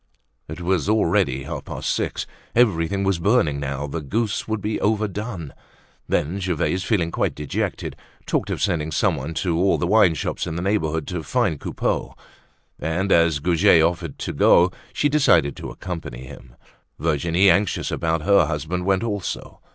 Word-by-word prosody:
It - - -7
was 90 -2 0
already 100 -10 +2
half - - -6
past - - -3
six. - - -2 0.3
Everything 100 -5 +2
was 95 -3 +1
burning 85 - +2
now; 70 0 -3
the 75 +3 -4
goose 105 - -2
would 110 -1 -1
be 105 +2 -3
overdone. 105 - -2 0.6
Then 85 +7 0
Gervaise, 90 0 -1
feeling 90 -6 0
quite - - -1
dejected, 75 -1 -3 0.3
talked - - -1
of - - -2
sending 80 -5 0
someone 80 -5 0
to 85 -2 0
all 95 +2 +3
the - - -1
wineshops 90 -5 +2
in 80 - -4
the 85 - -3
neighborhood 80 -6 0
to 90 -2 -3
find 75 0 0
Coupeau. - - -2 0.6
And 90 +5 -1
as 85 -2 +4
Goujet 80 +1 +4
offered 85 -2 -1
to - - -4
go, 90 +1 +5 0.2
she 145 - +1
decided 85 - +3
to - - -6
accompany 80 -9 -7
him. 60 -1 -13 0.4
Virginie, 85 +5 +3
anxious 100 -1 0
about 80 -2 -1
her 100 +2 +4
husband 80 +4 -3
went 95 +1 +2
also. 105 -5 -4
85 Hz, 160 wpm, -22 LUFS, 80-100 Hz, 0.6 s, go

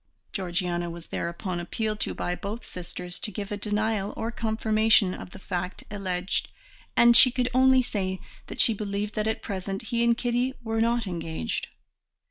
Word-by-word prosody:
Georgiana 175 -2 -1
was 170 0 -8
thereupon 175 +1 -3
appealed 215 +5 -2
to - - -2
by 175 - -2
both 205 +6 -5
sisters 180 0 -5
to - - -2
give 205 -1 -5
a - - 0
denial 210 0 -1
or 230 - -2
confirmation 220 -3 +3
of - - -8
the 185 - -11
fact 180 -1 -4
alleged, 190 -2 -1 0.5
and 235 0 +7
she 255 - +11
could 250 0 -1
only 260 0 +5
say 190 -5 -2 0.3
that - - -8
she 230 - +6
believed 205 0 -3
that 215 0 -1
at 220 - -1
present 195 -1 -3
he 235 -1 +1
and 235 0 +4
Kitty 245 +2 0
were 225 0 0
not 235 0 +2
engaged. 165 - -3
205 Hz, 170 wpm, -27 LUFS, 180-225 Hz, 0.5 s, she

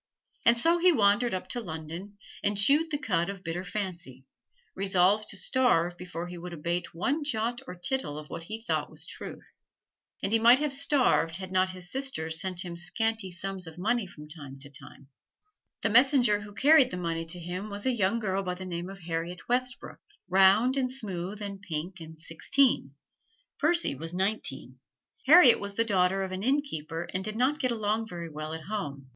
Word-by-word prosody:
And 235 0 +7
so 335 +8 +3
he 360 +1 +6
wandered 225 -2 +3
up 185 - -5
to 245 - -2
London 170 +3 -7 0.3
and 205 0 +1
chewed 290 +10 +4
the 295 - -1
cud 195 - 0
of 195 -1 -7
bitter 170 +2 -3
fancy, 175 -10 -6 0.5
resolved 195 +2 +2
to 200 - -2
starve 180 -9 +2
before 175 -1 -6
he 175 0 -8
would 175 0 -7
abate 170 +2 -3
one 275 - 0
jot 240 -3 -1
or 180 - -7
tittle 175 - -2
of 150 0 -8
what 165 - -6
he 220 +4 -6
thought - - -1
was - - -8
truth. - - -9 0.6
And 195 - -1
he 225 - +4
might 235 +3 +7
have 295 -1 -1
starved 265 - +2
had 190 -1 -6
not 185 0 +2
his 180 -1 -5
sisters 165 -13 -2
sent 185 -1 -2
him 175 -1 -6
scanty 215 +4 -1
sums 185 0 -4
of 160 +1 -10
money 215 +3 0
from 150 -3 -12
time 145 -3 -8
to 140 0 -8
time. 140 -1 -12 0.7
The 225 - +3
messenger 245 -3 +5
who 205 -1 -11
carried 280 -1 +6
the 180 - -5
money 165 -2 -3
to 175 +2 -6
him 180 +5 -5
was 205 0 -6
a 260 - +3
young 220 -2 +1
girl 195 -4 -1
by 180 -2 -3
the 185 +1 -8
name 175 0 -4
of 195 -1 -10
Harriet 170 +1 -4
Westbrook, 250 +1 -1 0.3
round 195 +8 +5
and 255 -2 0
smooth 205 -4 -4
and 200 -1 -6
pink 175 0 -5
and 160 -1 -10
sixteen. 165 - +1 0.6
Percy 340 - +2
was 165 +5 -7
nineteen. 180 -10 -2 0.5
Harriet 300 -5 +8
was 200 0 -5
the 230 - +2
daughter 190 -2 +2
of 190 - -4
an 185 0 -4
innkeeper 185 - -1
and 185 +1 -1
did 215 +1 -3
not 260 +6 +1
get 255 - +1
along 220 -1 -1
very 170 -4 -7
well 155 +1 -6
at 160 - -7
home. 145 -10 -5
195 Hz, 195 wpm, -28 LUFS, 170-235 Hz, 0.7 s, Harriet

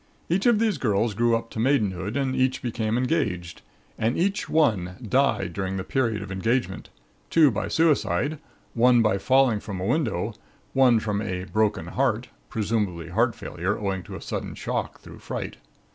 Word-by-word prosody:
Each 190 +7 +2
of 235 -3 +5
these 215 -7 +1
girls 110 -2 +1
grew 115 +2 +2
up 115 0 -9
to - - -5
maidenhood 105 -4 +1
and 135 -2 0
each 130 0 +1
became 115 -2 -1
engaged, 110 - -1 0.4
and 115 +3 +1
each 195 +3 0
one 105 - +2
died 115 -8 +1
during 95 0 -3
the 95 - -3
period 115 -4 0
of - - -8
engagement, 115 +7 -1 0.4
two 155 -4 +5
by 105 - -2
suicide, 150 - +1 0.3
one 120 0 +5
by 105 -3 +2
falling 130 -1 +3
from 100 -3 -6
a 90 - -3
window, 115 - 0 0.4
one 130 -4 +5
from 105 -1 -2
a 90 -4 -3
'broken 110 +2 0
heart' - - -1 0.2
(presumably 105 -6 -1
heart 115 +6 +1
failure, 95 +5 -3
owing 95 -2 -2
to - - -8
sudden - - -5
shock - - -3
through - - -12
fright). - - -5
115 Hz, 165 wpm, -25 LUFS, 100-130 Hz, 0.4 s, of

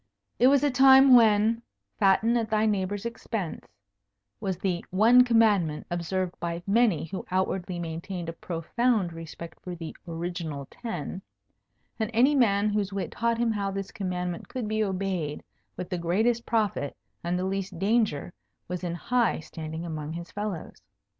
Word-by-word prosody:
It 250 - +6
was 280 +1 +4
a 290 - +3
time 265 +1 +7
when 225 0 +4 0.4
"fatten 215 +4 +4
at 225 -2 0
thy 215 0 +2
neighbour's 205 0 -1
expense" 225 -6 -4 0.7
was 190 -4 -2
the 180 -2 -2
one 230 +6 +6
commandment 210 -10 +3
observed 175 +1 -2
by 170 0 -3
many 205 -6 +3
who 185 +4 -6
outwardly 185 -1 -1
maintained 170 +1 -5
a 165 - -4
profound 180 +4 -1
respect 165 0 -9
for 180 -1 -6
the 165 -2 -7
original 165 -4 -4
ten; 190 -5 -5 0.8
and 220 -1 0
any 260 +6 +5
man 215 -6 +3
whose 205 -1 -1
wit 195 -3 -3
taught 235 0 0
him 235 -1 +1
how 200 -2 -1
this 195 0 -5
commandment 180 -3 -4
could 250 -4 -4
be 215 0 0
obeyed 185 -6 -2 0.3
with 180 +1 -6
the 180 - -1
greatest 220 +8 +1
profit 210 -10 0 0.3
and 175 +1 0
the 180 - -1
least 195 -1 -3
danger 195 -5 +1 0.3
was 180 +1 -4
in 170 -1 -2
high 240 +5 +1
standing 160 +1 -7
among 155 -2 -5
his 170 +1 -7
fellows. 205 -5 -5
195 Hz, 155 wpm, -27 LUFS, 170-225 Hz, 0.8 s, time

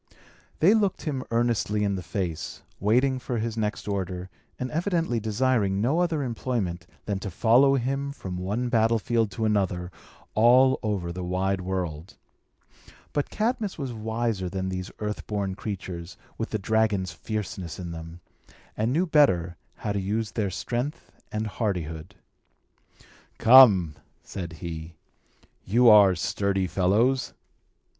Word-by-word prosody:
They 185 +7 +6
looked 205 -4 +1
him 140 -5 -2
earnestly 115 -3 +1
in 100 -1 +1
the 95 - -3
face, 85 -1 -4 0.2
waiting 130 +6 +2
for 125 -1 -3
his 115 0 -2
next 105 -2 -3
order, 95 -2 -3 0.3
and 125 0 -4
evidently 165 - 0
desiring 110 -2 +1
no 135 +10 +1
other 165 -4 +1
employment 115 -7 -3 0.2
than 100 -2 -2
to 100 - -5
follow 120 +9 +4
him 135 +2 -1
from 95 -10 -6
one 105 +7 -2
battlefield 115 -1 +2
to 110 - -2
another, 95 -4 0 0.4
all 125 +4 +5
over 100 -6 -2
the 90 +1 -5
wide 95 +2 -1
world. 90 -3 -4 1.0
But 145 - -1
Cadmus 220 -2 -1
was 135 -5 -4
wiser 110 -3 -2
than 95 0 -3
these 90 0 -4
earth 105 0 -4
born 100 -2 -2
creatures, 95 -3 -6 0.2
with 115 - -4
the 110 - -1
dragon's 105 -3 +1
fierceness 95 -2 -5
in 90 -2 -6
them, 80 +1 -9 0.5
and 110 +3 0
knew 165 +7 +2
better 95 - +3 0.2
how 105 - -4
to 100 - -1
use 105 +3 -2
their 105 -4 -1
strength 120 - -4 0.2
and 110 +1 -2
hardihood. 90 -5 -3 1.2
"Come!" 110 -10 +7 0.3
said 85 -4 -6
he. 80 0 -7 0.7
"You 120 +5 +5
are 100 -3 +7
sturdy 95 +3 0
fellows. 105 +9 +1
105 Hz, 135 wpm, -26 LUFS, 95-120 Hz, 1.2 s, Come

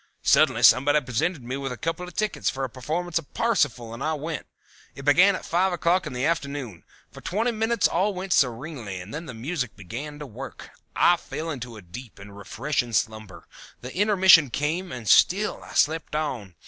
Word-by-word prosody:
Suddenly - - +4
somebody 145 +3 +6
presented 145 +4 -2
me 125 +3 -4
with 135 -1 -4
a 125 - -5
couple 165 +4 -3
of 180 - -12
tickets 215 -1 -1
for 135 - -4
a 130 - -2
performance 165 +7 -2
of 150 - -14
Parsifal 135 - 0
and 115 - -6
I 155 +1 0
went. 150 0 -5 0.5
It 140 - -9
began 180 +7 +5
at - - -7
five 185 +3 +1
o'clock 175 +2 +1
in - - -6
the 125 +2 -1
afternoon. 140 - -3 0.3
For - - -12
twenty 225 +6 0
minutes 225 -1 +1
all 190 +5 +1
went 185 0 -2
serenely 125 - -1
and 90 +4 -10
then 160 +2 -6
the 125 - -8
music 130 +1 -3
began 125 +10 -7
to 150 - -7
work. 135 +2 -9 0.2
I 175 - +5
fell 155 +2 -5
into 120 -5 -7
a 105 - -12
deep 115 +7 -11
and 100 0 -12
refreshing 120 +5 -3
slumber. 110 -2 -2 0.4
The 125 +1 -8
intermission 190 -7 +6
came, 160 +8 -2
and 120 -4 -7
still 200 - +4
I - - -12
slept 155 0 +1
on. 120 - -3
145 Hz, 195 wpm, -25 LUFS, 120-175 Hz, 0.5 s, somebody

